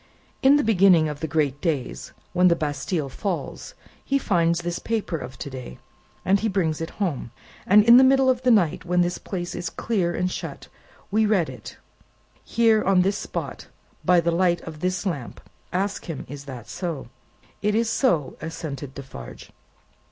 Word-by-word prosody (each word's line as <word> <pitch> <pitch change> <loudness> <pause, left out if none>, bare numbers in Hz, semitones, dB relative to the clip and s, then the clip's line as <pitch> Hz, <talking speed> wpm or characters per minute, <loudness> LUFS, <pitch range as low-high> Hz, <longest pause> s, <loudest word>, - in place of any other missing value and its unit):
"In 270 +2 +6
the 290 - +3
beginning 185 -6 +5
of 150 -1 -5
the 160 - -3
great 145 -2 0
days, 135 - -2 0.2
when 180 +1 +5
the 170 - +5
Bastille 150 0 -2
falls, 180 +7 -5 0.3
he 275 - +1
finds 170 -8 +1
this 175 0 -2
paper 220 -6 -2
of 130 0 -8
to - - -6
day, 130 - -8 0.5
and 195 +2 +4
he 220 - 0
brings 165 -6 0
it 165 - -3
home, 170 - -2 0.4
and 205 +2 +7
in 235 +2 +8
the 260 - +8
middle 265 0 +5
of 255 -1 +2
the 255 - +2
night 195 -10 +3
when 180 0 +2
this 175 0 0
place 175 -3 -5
is 175 - -4
clear 185 -7 -1
and 180 0 0
shut, - - -6 0.4
we 215 +1 +3
read 190 -7 +2
it, - - -10 0.7
here 225 -2 +3
on 190 -2 +4
this 195 +2 0
spot, - - -5 0.4
by 180 -1 +5
the 170 0 +1
light 175 0 +2
of 155 -2 -9
this 185 +3 -1
lamp. 145 -10 -4 0.3
Ask 195 +3 -2
him, 165 -6 -6
is 140 +1 -8
that 125 -5 -8
so." 165 -9 -5 0.5
"It 210 0 +1
is 230 +1 +2
so," 220 - +1
assented 145 -4 -6
Defarge. 130 - -10
175 Hz, 180 wpm, -24 LUFS, 155-205 Hz, 0.7 s, in